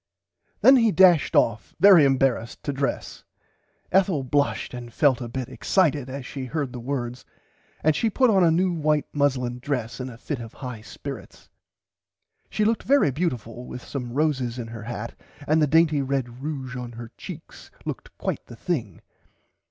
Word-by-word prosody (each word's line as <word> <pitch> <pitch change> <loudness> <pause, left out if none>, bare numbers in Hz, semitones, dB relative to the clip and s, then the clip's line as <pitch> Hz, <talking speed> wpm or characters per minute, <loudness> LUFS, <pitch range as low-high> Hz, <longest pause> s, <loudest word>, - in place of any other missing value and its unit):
Then 265 0 +8
he 230 -3 +4
dashed 180 -5 +5
off 110 -1 +1
very 190 -6 +8
embarrased 130 -4 +1
to 145 - -2
dress. 140 0 -3 0.7
Ethel 185 -7 +3
blushed 145 +1 0
and 120 -1 -7
felt 135 0 +2
a 120 - -4
bit 130 0 -4
excited 150 -8 +1
as 135 0 -6
she 135 0 -6
heard 140 -1 -3
the 125 - -6
words 125 -1 -4 0.6
and 155 0 +3
she 225 - +1
put 255 +3 +3
on 190 -3 +4
a 170 - +5
new 175 +3 +2
white 150 -2 +1
muslin 130 -4 0
dress 125 -3 -3
in 130 0 -4
a 115 - -11
fit 135 +2 -4
of 115 -2 -9
high 125 -5 -7
spirits. 130 0 -9 1.0
She 210 - 0
looked 225 +1 +1
very 275 - +3
beautifull 125 - -3
with 125 - -8
some 130 -3 -5
red - - -8
roses 130 -6 -2
in 115 -2 -5
her 115 -1 -8
hat 115 -1 -5 0.3
and 155 +1 +3
the 150 - +4
dainty 155 -1 +4
red 135 -1 -1 0.2
ruge 135 -4 -4
in 125 -1 -6
her 115 0 -9
cheeks - - -10 0.2
looked - - -7
quite - - -3
the 120 - -10
thing. 120 - -3
135 Hz, 175 wpm, -24 LUFS, 120-155 Hz, 1.0 s, Then